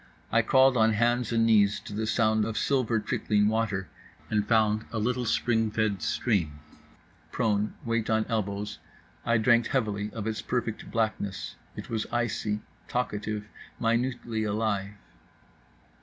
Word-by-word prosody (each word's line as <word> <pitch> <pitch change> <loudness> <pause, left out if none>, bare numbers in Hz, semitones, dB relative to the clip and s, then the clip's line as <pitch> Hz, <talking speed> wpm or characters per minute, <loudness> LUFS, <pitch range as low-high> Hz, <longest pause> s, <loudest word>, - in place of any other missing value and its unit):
I 115 - +5
crawled 130 +2 +4
on 110 0 +4
hands 120 +2 +1
and 115 -1 +3
knees 105 -3 +4
to - - -9
the 110 +1 -2
sound 110 -1 +2
of 110 0 -3
silver 125 -5 +1
trickling 105 0 +1
water 105 -4 0 0.4
and 105 -1 +1
found 110 -1 +3
a 115 - -3
little 125 +3 0
spring 115 -1 +1
fed 105 -3 0
stream. 80 - 0 0.7
Prone, 105 -1 0
weight 115 -1 0
on 110 0 +2
elbows, 105 -2 -2 0.5
I 115 - +4
drank 115 +1 +4
heavily 105 -5 -1
of 110 -3 -5
its 110 -1 -2
perfect 120 -3 -3
blackness. 110 -3 -2 0.2
It - - -8
was 110 -1 -1
icy, 110 -3 -1 0.3
talkative, 105 -3 -2 0.3
minutely 115 -1 0
alive. 105 -2 -1
110 Hz, 140 wpm, -28 LUFS, 105-115 Hz, 0.7 s, I